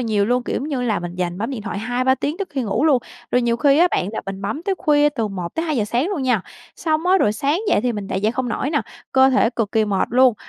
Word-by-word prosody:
nhiều 215 -4 +1
luôn, 245 +3 +1
kiểu - - -3
giống 285 - -3
như 265 -5 -2
là 220 -6 0
mình 175 0 -6
dành 180 0 -3
bấm 225 +5 -2
điện 240 -6 -5
thoại 205 -1 -4
2-3 250 +4 +1
tiếng 285 +5 -3
trước 395 - -4
khi 270 -3 -2
ngủ 220 +7 0
luôn. 285 -5 +5 0.3
Rồi 250 - +2
nhiều 235 0 +1
khi 280 +3 +4
á 355 +1 +5
bạn, 185 - 0
là - - -3
mình 195 0 -6
bấm 220 +11 -3
tới 390 0 0
khuya 295 -1 +3
từ 230 -7 -2
1:00-2:00 215 - -2
sáng 245 - 0
luôn 350 -10 -2
nha, 245 -6 +2 0.4
xong 315 +1 -1
á, 380 +1 +5
rồi 210 - +2
sáng 285 - 0
dậy - - +3
thì 245 0 0
mình 205 -2 -5
lại 190 - -1
dậy 215 +2 +1
không 255 -1 -2
nổi 270 +4 -2
nè, 295 - +1 0.3
cơ 265 0 +5
thể 250 -3 +3
cực 225 -4 -2
kỳ 220 -1 +3
mệt 200 -2 0
luôn. 255 -1 +5
245 Hz, 285 wpm, -21 LUFS, 210-290 Hz, 0.4 s, luôn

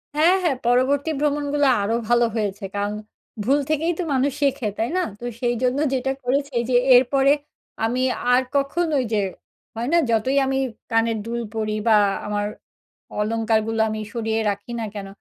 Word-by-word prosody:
হ্যাঁ, 330 +5 +5
হ্যাঁ। 300 -7 +1
পরবর্তী 265 +5 +2
ভ্রমণগুলো 290 0 +1 0.2
আরো 210 +3 0
ভালো 240 0 +4
হয়েছে। 205 -2 -2
কারন 205 +1 -1 0.5
ভুল 275 +6 +3
থেকেই 310 +2 +1
তো - - 0
মানুষ 270 +2 +2
শেখে। 275 -4 +1
তাই 225 +2 0
না? - - +2 0.2
তো 240 - -7 0.2
সেই 240 -1 +1
জন্য 255 +2 +1
যেটা 265 0 0
করেছি 275 +2 -1
যে, 250 - +2 0.2
এরপরে 270 +2 +4 0.5
আমি 245 +3 0 0.3
আর 250 - +5
কখনো 300 +3 +1
ঐ - - -1
যে, 215 - +2 0.6
হয় 230 +2 -3
না? - - +6
যতই 235 +5 +1
আমি 265 0 0 0.3
কানের 225 0 +2
দুল 235 +1 -3
পড়ি 215 -1 -2
বা 220 - +6 0.3
আমার 205 0 -1 0.7
অলংকারগুলো 225 +1 0
আমি 215 0 -3
সরিয়ে 225 -1 -1
রাখি 205 +3 -5
না 225 - -2
কেন, 200 -1 -5
245 Hz, 165 wpm, -22 LUFS, 225-280 Hz, 0.7 s, না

